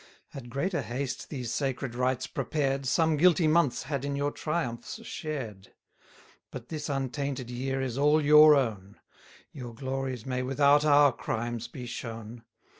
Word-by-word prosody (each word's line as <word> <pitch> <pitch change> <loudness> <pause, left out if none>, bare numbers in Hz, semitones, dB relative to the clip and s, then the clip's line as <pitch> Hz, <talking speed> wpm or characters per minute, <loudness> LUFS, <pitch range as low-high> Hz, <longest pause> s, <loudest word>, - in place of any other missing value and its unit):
Had 130 -4 -9
greater 170 +9 -1
haste 130 +1 -4
these 125 -5 -4
sacred 135 -1 -2
rites 125 +1 0
prepared, 135 0 -2
Some 160 +3 +2
guilty 170 +1 +4
months 155 -4 +2
had 140 -1 -3
in 140 0 -2
your 145 +1 -1
triumphs 155 - -4
shared: 120 - -6 0.8
But 125 -3 -9
this 155 -1 -5
untainted 135 -2 -3
year 135 +2 -2
is 130 0 -3
all 150 +2 +4
your 150 0 +8
own; 105 -7 -2 0.5
Your 120 -4 -8
glories 130 -2 -4
may 130 -1 -2
without 140 +3 +3
our 145 -1 +6
crimes 120 -1 -4
be 125 -3 -8
shown. 115 -1 -7
135 Hz, 145 wpm, -28 LUFS, 120-145 Hz, 0.8 s, your